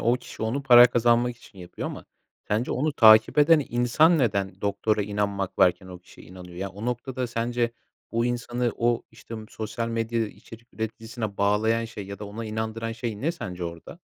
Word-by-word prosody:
o 120 +2 +3
kişi 125 - -10
onu 125 +6 -1
para 120 -2 +9
kazanmak 120 0 +2
için 100 -4 -18
yapıyor. 90 -1 -7
Ama - - -8 0.4
sence 110 +4 0
onu 150 +4 0
takip 110 +1 +6
eden 150 -1 +5
insan 135 +8 +3
neden 100 -6 -1
doktora 105 +1 0
inanmak 100 -1 -3
varken 90 +1 +3
o 90 -1 -10
kişiye 90 - -17
inanıyor? 90 0 -12
Ya, 95 +2 -3
o 100 +4 -9
noktada 125 +1 -3
sence 120 0 -1 0.4
o 115 +1 0
insanı, 120 0 -1
o, 120 0 +1
işte, 115 - -11
m 110 - -7
sosyal 110 +1 -4
medyada 115 0 -1
içerik 115 +2 -14
üreticisine 110 -1 -5
bağlayan 110 +3 +1
şey 105 -4 -8
ya 100 0 -8
da 105 - -7
ona 105 +3 -7
inandıran 110 +1 -4
şey 115 -3 -5
ne 165 +4 0
sence 90 - -6
orada? 85 -1 -8
115 Hz, 185 wpm, -25 LUFS, 105-120 Hz, 0.4 s, para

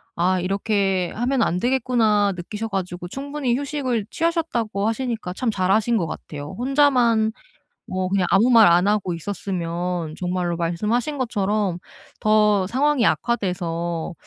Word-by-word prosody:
'아 180 +2 +1
이렇게 195 -1 0
하면 245 +2 0
안 180 -4 +1
되겠구나.' 225 -4 +2
느끼셔 210 +5 -5
가지고 180 -3 -4
충분히 275 0 -2
휴식을 265 -6 -2
취하셨다고 275 - -1
하시니까 225 -5 -3
참 230 +3 -1
잘 185 -2 -1
하신 225 +3 +2
것 170 -6 -1
같아요. 150 +1 -7
혼자만 245 -4 +3 0.5
뭐 185 0 -2
그냥 190 -1 +1
아무 220 +6 +4
말 230 -5 +7
안 175 +3 +4
하고 205 -4 +1
있었으면 175 -2 -3
정말로 180 -1 -2
말씀하신 215 - -1
것처럼 205 -6 -1 0.4
더 210 -3 +3
상황이 270 +1 +2
악화돼서 175 -7 -1
205 Hz, 310 characters per minute, -22 LUFS, 180-240 Hz, 0.5 s, 말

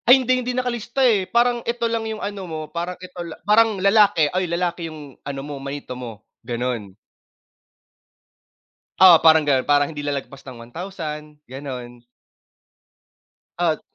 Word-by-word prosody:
Ay 250 +2 +9
hindi, 255 0 +1
hindi 250 0 -3
nakalista 250 +1 -1
eh 205 -6 +2
parang 240 0 +2
eto 235 0 -2
lang 230 0 0
'yung 220 - -4
ano 205 -1 -5
mo, 160 -1 -4
parang 175 +2 -4
eto 180 -1 -9
lang 170 -2 -7
parang 215 0 +4
lalaki 200 -5 +4
ay 185 -1 0
lalaki 170 -1 -2
'yung 150 -3 -11
ano 140 -1 -5
mo 145 -2 -7
manito 140 -1 -6
mo 115 -4 -9 0.2
ganun. 120 -5 -4 2.0
Oo 185 -2 +10
parang 160 -2 +6
ganun, 135 -3 +3
para 145 0 +3
hindi 145 -1 -7
lalagpas 140 -1 -5
ng 130 -3 -10
1000 150 -1 -7
ganun. 125 -3 -8 1.6
At 165 -3 +1
165 Hz, 145 wpm, -22 LUFS, 140-205 Hz, 2.0 s, Oo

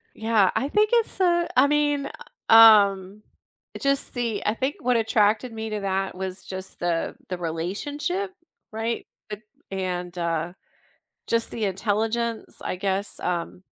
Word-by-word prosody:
Yeah, 220 -3 +3
I 275 - 0
think 425 +4 +2
it's, 460 -4 +1
uh 345 -2 +3
I 275 +2 +7
mean, 290 -1 +1 0.4
um, 205 -3 +6 0.5
it - - -9
just 275 0 0
the 235 -4 -2
I 210 - +2
think 265 +5 -2
what 250 0 +1
attracted 225 +1 +2
me 220 0 -5
to 210 -1 -3
that 195 -1 -1
was 190 0 -5
just 190 0 -8
the 170 -1 -1
the 180 - -4
relationship, 285 - -3 0.4
right, 225 +1 -3 0.2
eh 210 - -3 0.4
and, 180 -2 -3
uh, 170 0 -2 0.7
just 230 0 0
the 220 - -3
intelligence, 220 +4 -2
I - - -3
guess, 195 +1 -2
um, 180 +1 -3
215 Hz, 145 wpm, -24 LUFS, 190-250 Hz, 0.7 s, I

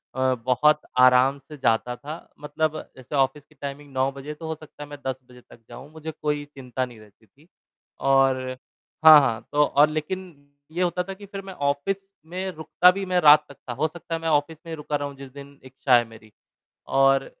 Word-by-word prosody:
अ, 130 0 +2
बहुत 150 +4 +3 0.2
आराम 130 +2 +5
से 150 +2 -13
जाता 125 -1 +1
था 150 +5 -7 0.3
मतलब 155 +1 -1 0.2
जैसे 130 +3 -7
ऑफ़िस 135 +1 +1
की 155 - -26
टाइमिंग 140 +1 -8
9 130 +1 +1
बजे, 140 +2 -7
तो 160 +1 -9
हो 160 - -3
सकता 155 -1 -12
है 145 - -11
मैं 145 - -8
10 130 0 -3
बजे 125 0 -15
तक 120 - -16
जाऊँ, 140 +3 -11
मुझे 160 0 -7
कोई 150 -1 -1
चिंता 130 -3 -5
नहीं 120 -3 -14
रहती 110 +1 -20
थी। 140 - -26 0.5
और 135 -1 +3 0.7
हाँ, 155 -1 +11
हाँ, 115 -4 -1
तो 150 0 +4
और 145 +1 +4
लेकिन 170 +3 -4 0.4
ये 175 +3 -1
होता 180 0 0
था 195 +1 -7
कि 200 +1 -12
फिर 195 0 -7
मैं 190 - -8
ऑफ़िस 145 +5 -1 0.3
में 185 +2 -4
रुकता 170 +2 +4
भी 195 +1 -4
मैं 180 -1 +1
रात 150 -1 +7
तक 140 - -12
था, - - -2
हो 145 +6 0
सकता 165 +1 -6
है - - -4
मैं 165 - -1
ऑफ़िस 150 +1 +1
में 165 - -8
ही - - -3
रुका 150 0 -4
रहूँ 145 -1 -3
जिस 135 -1 -10
दिन 140 0 -12
इच्छा 130 -1 +2
है 120 - +5
मेरी। 110 -1 -16 0.7
और 135 0 +4
145 Hz, 215 wpm, -24 LUFS, 130-160 Hz, 0.7 s, हाँ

